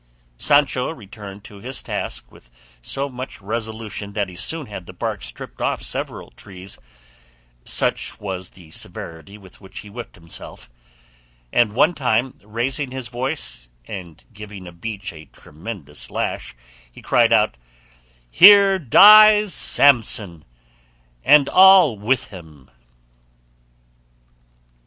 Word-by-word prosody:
Sancho 145 -3 +2
returned 105 -6 -11
to 105 - -13
his 125 +6 -5
task - - -5
with - - -20 0.3
so 135 - -3
much 130 -3 -8
resolution 110 -1 -6
that 100 -2 -2
he 90 - -12
soon 160 - -2
had 100 -5 -9
the - - -10
bark 90 - -4
stripped - - -8
off - - -1
several - - -5
trees, 95 +8 -10 0.9
such - - 0
was 95 -2 -6
the 85 -4 -17
severity 80 +6 -7
with 95 -2 -18
which 95 -1 -10
he 105 - -14
whipped 120 +2 -9
himself; 85 -6 -10 0.8
and 115 -4 +2
one 155 +9 +3
time, 125 -3 -1
raising 120 +6 -3
his 130 -2 -6
voice, 120 - -4 0.2
and 85 +1 -10
giving 105 -2 -10
a 90 - -10
beech 100 +3 -7
a 80 -1 -12
tremendous 75 -1 -9
lash, - - -4 0.4
he - - -15
cried 115 -1 +3
out, 110 - +3 0.8
"Here 195 0 +7
dies 210 - +7
Samson, 110 - +2 0.8
and 145 -2 +5
all 190 - +6
with 110 +5 -1
him!" 80 -8 -14
105 Hz, 125 wpm, -20 LUFS, 95-130 Hz, 0.9 s, Here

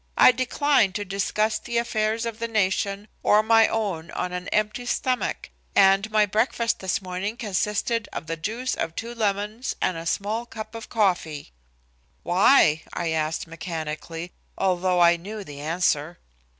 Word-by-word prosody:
I - - +8
decline 255 -3 +2
to 205 +1 -3
discuss 205 +3 0
the 235 -1 -3
affairs 225 -1 0
of 230 -1 -5
the 230 - -2
nation 200 -1 0
or 210 +1 +4
my 225 0 +5
own 185 -7 -2
on 180 0 -3
an 180 0 -4
empty 215 +3 -1
stomach, 255 0 -1 0.2
and 195 +2 +5
my 215 -1 +4
breakfast 230 +3 0
this 190 0 -2
morning 185 +5 -4
consisted 210 0 -1
of 150 - -5
the 165 +1 -3
juice 225 +10 -3
of 165 - -3
two 235 +1 -5
lemons 215 +2 -2
and 180 - 0
a 165 +1 -6
small 215 +6 -1
cup 215 -1 -8
of 225 0 -8
coffee." 175 - 0 0.7
"Why?" 175 - +5
I 170 -2 -2
asked 160 0 -1
mechanically, 165 0 -6 0.3
although 185 -1 +1
I 170 0 +6
knew 205 +5 -7
the 145 -5 -10
answer. 160 0 0
200 Hz, 155 wpm, -25 LUFS, 175-225 Hz, 0.7 s, I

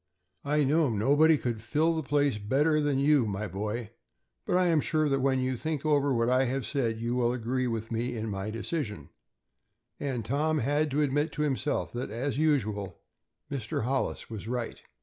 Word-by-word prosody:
I 150 +1 +2
know 150 +1 +3
nobody 145 +9 +4
could 120 -5 -3
fill 155 +8 +1
the 160 - -1
place 140 -5 +1
better 145 +9 +2
than 145 -2 +1
you, 140 -3 +4
my 100 +1 -3
boy, 105 +4 -4 0.6
but 180 - +2
I 185 - +3
am 165 -3 +3
sure 155 0 +1
that 135 -1 +1
when 135 0 +2
you 130 0 0
think 155 +3 -3
over 145 -2 +3
what 115 -2 +2
I 130 +1 +3
have 130 +1 -2
said 115 -6 -1
you 120 +1 -1
will 120 -1 +2
agree 125 +2 -1
with 115 -1 -3
me 120 +1 -2
in 110 0 -3
my 100 0 -3
decision," 115 - -4 0.9
and 130 -6 -3
Tom 150 +6 +1
had 145 +4 +1
to 145 +2 +1
admit 145 +3 0
to 150 - -1
himself 145 0 -1
that, 120 +2 -3
as 130 +6 -2
usual, 110 -11 0 0.5
Mr. 115 -5 -2
Hollis 130 +3 -1
was 110 -1 -7
right. 120 -1 -3
130 Hz, 190 wpm, -29 LUFS, 115-150 Hz, 0.9 s, nobody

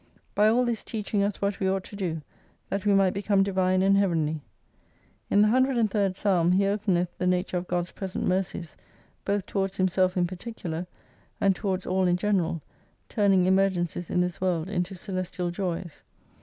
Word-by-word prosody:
By 210 +1 +4
all 240 +3 +3
this 235 -3 -1
teaching 210 -2 -2
us 200 0 -1
what 200 0 0
we 190 - +1
ought 190 0 0
to 205 - -11
do, 165 -6 -3 0.5
that 200 +1 -1
we 205 - +5
might 195 -2 +4
become 200 0 +2
divine 185 -1 +1
and 195 +1 +4
heavenly. 160 -6 +1 0.9
In 205 - +5
the - - +5
103rd 225 -6 +2
psalm 180 -4 +2
he 195 +2 +3
openeth 195 -4 0
the 180 - 0
nature 180 0 0
of 175 0 -4
God's 175 0 -1
present 190 -2 -4
mercies, 180 -3 -2 0.5
both 200 -1 0
towards 195 -1 -2
himself 185 0 +2
in 180 - +3
particular, 175 -2 -5 0.5
and 195 -1 +3
towards 190 0 -2
all 185 0 +1
in 175 0 +2
general, 180 -6 0 0.5
turning 195 -4 +3
emergencies 185 -3 +1
in 180 - +2
this 180 -1 -2
world 180 -2 0
into 180 0 -2
celestial 185 -1 -3
joys. 175 -3 -4
190 Hz, 170 wpm, -27 LUFS, 180-200 Hz, 0.9 s, we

